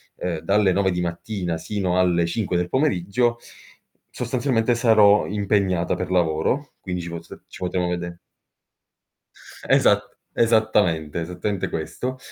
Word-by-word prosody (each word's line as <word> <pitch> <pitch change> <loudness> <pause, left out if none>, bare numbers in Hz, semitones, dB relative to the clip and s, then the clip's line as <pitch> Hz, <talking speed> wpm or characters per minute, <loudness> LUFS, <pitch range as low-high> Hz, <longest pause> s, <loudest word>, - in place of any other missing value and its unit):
uhm, 85 -3 -3
dalle 100 +3 +2
9 95 0 +2
di 90 0 -2
mattina 85 0 -3
sino 95 -1 -1
alle 85 -2 +3
5 90 +1 -1
del 90 0 -1
pomeriggio, 120 - +1 0.7
sostanzialmente 125 -1 0
sarò 110 -3 +5
impegnata 100 -3 0
per 90 - -4
lavoro 90 - 0
quindi 90 -2 -4
ci 85 - -6
pos 85 0 -8 0.2
ci - - -12
potremo 90 -1 -1
vede" 85 -1 -4 1.5
Esat - - +3 0.2
esattamente, 105 -9 +2
esattamente 90 +4 -3
questo; 125 +11 -4
95 Hz, 120 wpm, -23 LUFS, 85-110 Hz, 1.5 s, sarò